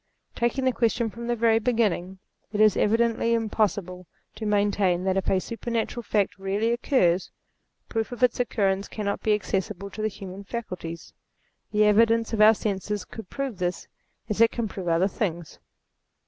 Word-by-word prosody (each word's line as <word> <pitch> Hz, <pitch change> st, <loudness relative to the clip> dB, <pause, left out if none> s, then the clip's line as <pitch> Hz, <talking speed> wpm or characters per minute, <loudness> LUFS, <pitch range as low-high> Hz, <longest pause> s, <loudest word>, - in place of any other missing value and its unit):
Taking 240 Hz, +3 st, 0 dB
the 260 Hz, -, +4 dB
question 230 Hz, -1 st, 0 dB
from 235 Hz, +1 st, -7 dB
the 240 Hz, -, +1 dB
very 225 Hz, -1 st, +3 dB
beginning; 210 Hz, -6 st, 0 dB, 0.3 s
it 210 Hz, -, -3 dB
is 215 Hz, -2 st, +6 dB
evidently 230 Hz, +1 st, +2 dB
impossible 205 Hz, -5 st, -1 dB, 0.3 s
to 215 Hz, 0 st, -5 dB
maintain 200 Hz, -3 st, +2 dB
that 190 Hz, 0 st, +1 dB
if 195 Hz, -, 0 dB
a 190 Hz, -, +3 dB
super 230 Hz, +5 st, -6 dB
natural 235 Hz, +1 st, -1 dB
fact 205 Hz, -3 st, 0 dB
really 200 Hz, +4 st, 0 dB
occurs, 215 Hz, -, +2 dB, 0.6 s
proof 225 Hz, 0 st, -2 dB
of 245 Hz, 0 st, -4 dB
its 250 Hz, -1 st, +3 dB
occurrence 200 Hz, -5 st, 0 dB
cannot 200 Hz, -2 st, -3 dB
be 215 Hz, -1 st, +3 dB
accessible 200 Hz, -1 st, -3 dB
to 215 Hz, -, -6 dB
the 215 Hz, -, +1 dB
human 195 Hz, -1 st, -8 dB
faculties. 185 Hz, -7 st, -6 dB, 0.6 s
The 210 Hz, 0 st, +3 dB
evidence 225 Hz, +2 st, +3 dB
of 215 Hz, -, +1 dB
our 215 Hz, +1 st, +8 dB
senses 205 Hz, -1 st, -3 dB
could 220 Hz, -4 st, -10 dB
prove 270 Hz, -8 st, -4 dB
this 180 Hz, 0 st, -2 dB, 0.4 s
as 210 Hz, +1 st, -1 dB
it 230 Hz, -, +7 dB
can 235 Hz, -1 st, -3 dB
prove 190 Hz, -2 st, -7 dB
other 170 Hz, +3 st, +3 dB
things. 175 Hz, -7 st, -4 dB
210 Hz, 170 wpm, -26 LUFS, 190-230 Hz, 0.6 s, our